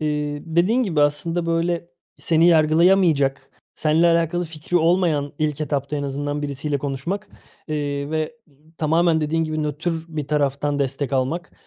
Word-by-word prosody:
Eee, 150 Hz, -1 st, -2 dB
dediğin 180 Hz, +10 st, +2 dB
gibi 165 Hz, -9 st, 0 dB
aslında 165 Hz, +4 st, +1 dB
böyle 170 Hz, +1 st, -1 dB, 0.3 s
seni 165 Hz, +1 st, +3 dB
yargılayamayacak, 160 Hz, -3 st, +3 dB, 0.2 s
senle 160 Hz, +2 st, +2 dB
alakalı 170 Hz, +1 st, +1 dB
fikri 160 Hz, +2 st, -3 dB
olmayan 165 Hz, -4 st, +2 dB
ilk 155 Hz, -1 st, -1 dB
etapta 145 Hz, -1 st, -2 dB
en 145 Hz, -, -3 dB
azından 145 Hz, +1 st, -3 dB
birisiyle 140 Hz, 0 st, -2 dB
konuşmak. 140 Hz, +8 st, -4 dB, 0.4 s
Eee, 145 Hz, -1 st, -2 dB
ve, 160 Hz, +8 st, -2 dB
ımm, 150 Hz, +3 st, -26 dB
tamamen 160 Hz, +1 st, +2 dB
dediğin 160 Hz, +2 st, 0 dB
gibi 155 Hz, 0 st, -2 dB
nötr 150 Hz, +3 st, -2 dB, 0.2 s
bir 155 Hz, -3 st, -4 dB
taraftan 145 Hz, 0 st, 0 dB
destek 135 Hz, 0 st, -2 dB
almak, 135 Hz, +7 st, -1 dB
155 Hz, 145 wpm, -22 LUFS, 145-165 Hz, 0.4 s, seni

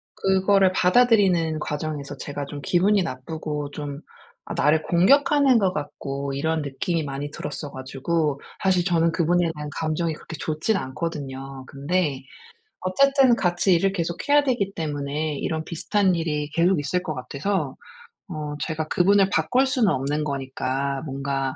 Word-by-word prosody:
그거를 190 Hz, 0 st, +3 dB
받아들이는 185 Hz, -6 st, +3 dB
과정에서 150 Hz, -1 st, -4 dB
제가 145 Hz, +1 st, -5 dB
좀 145 Hz, +1 st, -8 dB
기분이 190 Hz, +7 st, +3 dB
나쁘고 150 Hz, 0 st, -5 dB
좀 145 Hz, -1 st, -6 dB, 0.5 s
아 -, -, -3 dB
나를 155 Hz, +2 st, +3 dB
공격하는 275 Hz, -, +4 dB
것 190 Hz, -3 st, +1 dB
같고 140 Hz, -2 st, -4 dB
이런 160 Hz, +3 st, -1 dB
느낌이 155 Hz, +4 st, -2 dB
많이 140 Hz, 0 st, -4 dB
들었어 145 Hz, 0 st, -6 dB
가지고 140 Hz, +3 st, -2 dB, 0.2 s
사실 185 Hz, -2 st, +3 dB
저는 170 Hz, -2 st, +2 dB
그분에 170 Hz, 0 st, +2 dB
대한 150 Hz, 0 st, -6 dB
감정이 160 Hz, +1 st, -1 dB
그렇게 160 Hz, +1 st, -9 dB
좋지는 160 Hz, +7 st, 0 dB
않거든요. 135 Hz, -2 st, -5 dB
근데 140 Hz, -1 st, -1 dB, 0.6 s
어쨌든 270 Hz, +6 st, +4 dB
같이 175 Hz, +1 st, +2 dB
일을 195 Hz, +3 st, +2 dB
계속해야 195 Hz, -, +1 dB
되기 240 Hz, -8 st, 0 dB
때문에 150 Hz, -1 st, -2 dB
이런 160 Hz, 0 st, -2 dB
비슷한 190 Hz, +3 st, +1 dB
일이 150 Hz, -3 st, -2 dB
계속 170 Hz, +2 st, +2 dB
있을 180 Hz, +5 st, -1 dB
것 155 Hz, -, -3 dB
같아서 140 Hz, +3 st, -2 dB, 0.5 s
어 150 Hz, -3 st, -5 dB
제가 155 Hz, +2 st, -2 dB
그분을 195 Hz, +3 st, +4 dB
바꿀 160 Hz, -, +2 dB
수는 250 Hz, -5 st, +2 dB
없는 145 Hz, +3 st, -1 dB
거니까 135 Hz, -1 st, -2 dB
뭔가 135 Hz, -1 st, -2 dB
160 Hz, 325 characters per minute, -24 LUFS, 145-185 Hz, 0.6 s, 공격하는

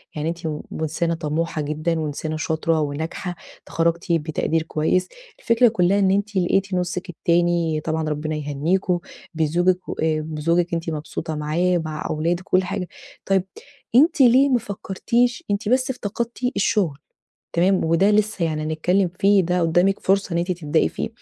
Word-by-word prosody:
يعني 155 Hz, +1 st, -2 dB
أنتِ 170 Hz, 0 st, -5 dB
م 150 Hz, -1 st, -4 dB, 0.2 s
إنسانة 160 Hz, +2 st, -1 dB
طموحة 160 Hz, 0 st, -2 dB
جدًا 155 Hz, +3 st, -1 dB
وإنسانة 155 Hz, +1 st, -3 dB
شاطرة 160 Hz, +1 st, 0 dB
وناجحة، 160 Hz, +5 st, -4 dB, 0.3 s
اتخرجتِ 170 Hz, +1 st, -1 dB
بتقدير 160 Hz, 0 st, 0 dB
كويس، 160 Hz, +3 st, 0 dB, 0.3 s
الفكرة 230 Hz, +1 st, +4 dB
كلها 200 Hz, -3 st, +2 dB
إن 190 Hz, -1 st, +3 dB
أنتِ 205 Hz, +1 st, -1 dB
لقيتِ 195 Hz, +2 st, +1 dB
نصِك 180 Hz, +1 st, -2 dB
التاني- 170 Hz, -2 st, +1 dB
طبعًا 160 Hz, -1 st, -1 dB
ربنا 155 Hz, +1 st, -2 dB
يهنيكم- 160 Hz, +5 st, 0 dB, 0.4 s
بزوجِك 175 Hz, +4 st, +1 dB
و -, -, -3 dB, 0.3 s
بزوجِك 165 Hz, +3 st, 0 dB
أنتِ 165 Hz, 0 st, -2 dB
مبسوطة 155 Hz, +1 st, -4 dB
معاه 170 Hz, +4 st, +1 dB
مع 155 Hz, 0 st, -4 dB
أولادِك 170 Hz, +4 st, -1 dB
و -, -, -25 dB
كل -, -, -1 dB
حاجة. 180 Hz, 0 st, -3 dB, 0.4 s
طيب 195 Hz, -1 st, +2 dB, 0.5 s
أنتِ 295 Hz, +3 st, +5 dB
ليه 260 Hz, +3 st, +6 dB
ما 250 Hz, -2 st, +3 dB
فكرتيش 235 Hz, -, -1 dB
أنتِ 205 Hz, +1 st, -1 dB
بس 255 Hz, +2 st, +2 dB
افتقدتِ 235 Hz, -1 st, -4 dB, 0.2 s
الشغل 195 Hz, -6 st, +1 dB, 0.6 s
تمام، 185 Hz, +2 st, +3 dB
وده 165 Hz, +5 st, +3 dB
لسه 210 Hz, -3 st, +1 dB
يعني 155 Hz, -1 st, -2 dB
هنتكلم 175 Hz, +4 st, +1 dB
فيه 200 Hz, 0 st, +5 dB
ده 180 Hz, +1 st, 0 dB
قدامِك 175 Hz, +4 st, +2 dB
فرصة 195 Hz, -1 st, +1 dB
إن 170 Hz, -, +1 dB
أنتِ 175 Hz, +2 st, 0 dB
تبدئي 150 Hz, -, +1 dB
فيه. -, -, -4 dB
175 Hz, 155 wpm, -22 LUFS, 155-195 Hz, 0.6 s, ليه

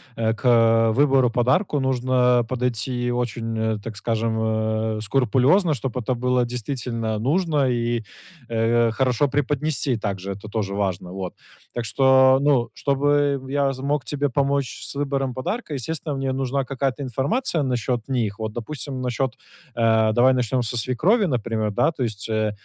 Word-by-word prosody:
э, 110 Hz, 0 st, 0 dB
к 115 Hz, -1 st, +4 dB
выбору 135 Hz, -1 st, +4 dB
подарка 130 Hz, -, +1 dB
нужно 125 Hz, -2 st, +2 dB
подойти 125 Hz, 0 st, -2 dB
очень, 115 Hz, -2 st, -2 dB
э, 110 Hz, -1 st, 0 dB
так 115 Hz, -2 st, -7 dB
скажем, 115 Hz, +1 st, -1 dB
э, 110 Hz, 0 st, -1 dB
скрупулезно, 135 Hz, -, +3 dB
чтобы 130 Hz, -1 st, -3 dB
это 125 Hz, +2 st, -1 dB
было 125 Hz, 0 st, +1 dB
действительно 120 Hz, -2 st, -3 dB
нужно 150 Hz, -, +1 dB
и, 120 Hz, -1 st, -1 dB, 0.5 s
э, 115 Hz, 0 st, +2 dB
хорошо 130 Hz, +3 st, +1 dB
преподнести 145 Hz, -1 st, 0 dB
также, 100 Hz, -2 st, -4 dB
это 100 Hz, +2 st, -8 dB
тоже 100 Hz, -3 st, -2 dB
важно, 95 Hz, -3 st, -2 dB
вот. 95 Hz, -1 st, -5 dB, 0.4 s
Так 120 Hz, -, -3 dB
что, 130 Hz, +4 st, +5 dB
ну, 140 Hz, -4 st, +2 dB
чтобы 145 Hz, 0 st, +1 dB
я 140 Hz, -1 st, +1 dB
з 130 Hz, -, -10 dB
мог 145 Hz, 0 st, -1 dB
тебе 145 Hz, -1 st, -1 dB
помочь 140 Hz, 0 st, -1 dB
с -, -, -6 dB
выбором 135 Hz, -2 st, -1 dB
подарка, 160 Hz, -, -4 dB
естественно, 150 Hz, +2 st, -4 dB
мне 135 Hz, -1 st, -1 dB
нужна 135 Hz, +1 st, -1 dB
какая-то 135 Hz, +1 st, -2 dB
информация 145 Hz, -, -1 dB
насчет 125 Hz, -2 st, -1 dB
них. 115 Hz, -5 st, -1 dB
Вот, 110 Hz, -1 st, -4 dB
допустим, 130 Hz, +3 st, -6 dB
насчет, 125 Hz, 0 st, -1 dB, 0.4 s
э, 110 Hz, -1 st, +3 dB
давай 130 Hz, +3 st, +5 dB
начнем 125 Hz, 0 st, 0 dB
со 120 Hz, +1 st, -3 dB
свекрови, 190 Hz, -, +2 dB
например, 115 Hz, -, -1 dB
да. 100 Hz, -, +2 dB
То 145 Hz, -5 st, -3 dB
есть, 110 Hz, -2 st, -4 dB
э, 110 Hz, -1 st, 0 dB
125 Hz, 155 wpm, -23 LUFS, 115-135 Hz, 0.5 s, что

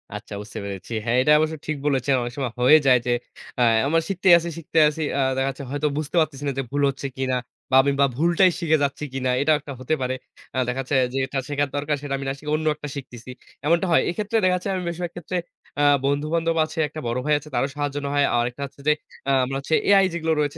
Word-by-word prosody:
আচ্ছা 105 Hz, 0 st, -8 dB
বুঝতে 105 Hz, -, -10 dB
পেরেছি। 100 Hz, +3 st, -7 dB
হ্যাঁ 120 Hz, +1 st, +2 dB
এটা 150 Hz, +4 st, +3 dB
অবশ্য 155 Hz, 0 st, 0 dB
ঠিক 155 Hz, -, -1 dB
বলেছেন। 140 Hz, -1 st, +1 dB
অনেক 120 Hz, 0 st, -4 dB
সময় 130 Hz, -4 st, -2 dB
হয়ে 140 Hz, +5 st, +8 dB
যায় 125 Hz, -1 st, +6 dB
যে -, -, +2 dB, 0.5 s
অ্যা 125 Hz, -, +3 dB, 0.2 s
আমার 165 Hz, +2 st, +2 dB
শিখতেই 190 Hz, -1 st, +4 dB
আছি, 170 Hz, 0 st, -3 dB
শিখতে 165 Hz, 0 st, -5 dB
আছি 155 Hz, +1 st, -6 dB
অ্যা 140 Hz, -, +1 dB, 0.2 s
দেখা 135 Hz, +1 st, +1 dB
যাচ্ছে 135 Hz, +1 st, -7 dB
হয়তো 145 Hz, +1 st, 0 dB
বুঝতে 155 Hz, +2 st, -4 dB
পারতেছি 145 Hz, -3 st, -1 dB
না 140 Hz, -, +1 dB
যে -, -, 0 dB
ভুল 145 Hz, 0 st, 0 dB
হচ্ছে 140 Hz, +1 st, -4 dB
কিনা 130 Hz, -1 st, 0 dB, 0.3 s
বা -, -, +4 dB
আমি 140 Hz, -, +2 dB
বা -, -, +7 dB
ভুলটাই 175 Hz, +4 st, +4 dB
শিখে 160 Hz, -2 st, +2 dB
যাচ্ছি 140 Hz, +1 st, -2 dB
কিনা। 130 Hz, -1 st, -1 dB
এটাও 155 Hz, +2 st, +4 dB
একটা 140 Hz, -1 st, -8 dB
হতে 130 Hz, +4 st, -2 dB
পারে। 130 Hz, 0 st, -1 dB, 0.4 s
আ -, -, -2 dB
দেখা 130 Hz, +2 st, -1 dB
যাচ্ছে 135 Hz, +2 st, -2 dB, 0.2 s
যে 135 Hz, -, -2 dB, 0.3 s
শেখার 145 Hz, -1 st, 0 dB
দরকার 145 Hz, +1 st, 0 dB
সেটা 145 Hz, -1 st, -4 dB
আমি 135 Hz, -, -6 dB
না -, -, -1 dB
শিখে 150 Hz, +1 st, -6 dB
অন্য 155 Hz, 0 st, -3 dB
একটা 150 Hz, -1 st, -7 dB
শিখতেছি। 125 Hz, -2 st, -8 dB, 0.3 s
এমনটা 170 Hz, +4 st, +3 dB
হয়। 165 Hz, -, +5 dB
এক্ষেত্রে 210 Hz, +5 st, -1 dB
দেখা 185 Hz, 0 st, +4 dB
যাচ্ছে, 180 Hz, +2 st, -5 dB
আমি 185 Hz, -, -2 dB
বেশিরভাগ 170 Hz, 0 st, -4 dB
ক্ষেত্রে 175 Hz, +1 st, -4 dB, 0.4 s
আ -, -, +3 dB, 0.2 s
বন্ধু-বান্ধব 155 Hz, +4 st, 0 dB
আছে, 160 Hz, -, -7 dB
একটা 155 Hz, +2 st, -8 dB
বড় 120 Hz, +1 st, -1 dB
ভাই 150 Hz, -, +2 dB
আছে 150 Hz, -, -13 dB
তারও 120 Hz, +3 st, +1 dB
সাহায্য 145 Hz, -1 st, -2 dB
নেওয়া 140 Hz, 0 st, -2 dB
হয়। 145 Hz, -, +4 dB
আরেকটা 120 Hz, +3 st, -2 dB
হচ্ছে 140 Hz, +1 st, -13 dB
যে 150 Hz, -, +6 dB, 0.4 s
আ -, -, +4 dB
আমরা 135 Hz, +1 st, -3 dB
হচ্ছে 155 Hz, +3 st, 0 dB
AI 195 Hz, -1 st, +6 dB
যেগুলো 160 Hz, -1 st, 0 dB
রয়েছে 145 Hz, -1 st, -1 dB
145 Hz, 240 wpm, -23 LUFS, 135-160 Hz, 0.5 s, হয়ে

